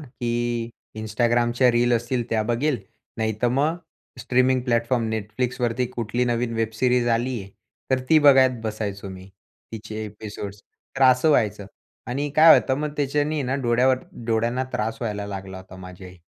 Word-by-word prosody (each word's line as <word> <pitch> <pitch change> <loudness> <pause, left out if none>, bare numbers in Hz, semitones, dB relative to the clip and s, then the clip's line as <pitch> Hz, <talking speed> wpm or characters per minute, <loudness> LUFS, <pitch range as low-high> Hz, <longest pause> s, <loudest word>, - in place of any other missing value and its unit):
की 120 -3 -3 0.3
Instagramच्या 120 +3 +2
रील्स 120 0 +3
असतील 120 0 -1
त्या 110 -1 +1
बघेल, 120 +4 0 0.4
नाहीतर 110 +2 0
मग 145 +6 +1 0.4
स्ट्रीमिंग 130 +1 +2
प्लॅटफॉर्म 115 -1 0
Netflixवरती 120 +3 -2
कुठली 120 0 -2
नवीन 120 -1 -1
वेब 115 -1 -1
सीरीज 125 0 +2
आली 120 +1 0
आहे, 95 - -10 0.4
तर 130 0 +2
ती 160 - +6
बघत 130 -4 +5
बसायचो 105 -2 -4
मी. 95 0 -10 0.4
तिचे 110 -1 -6
एपिसोड्स. 105 -1 -8 0.4
तर 135 - +1
असं 130 +4 +5
व्हायचं. 105 -6 +1 0.4
आणि 140 +4 -2
काय 160 +1 +9
होतं 130 - -1
मग 150 - -2
त्याच्यानी 145 +2 0
आहे 145 - -1
ना 130 - -1
डोळ्यावर 125 +2 +3 0.3
डोळ्यांना 120 +3 0
त्रास 110 +1 -2
व्हायला 105 -3 -3
लागला 95 -1 -7
होता 95 0 -13
माझ्याही. 90 0 -11
120 Hz, 150 wpm, -23 LUFS, 110-130 Hz, 0.4 s, काय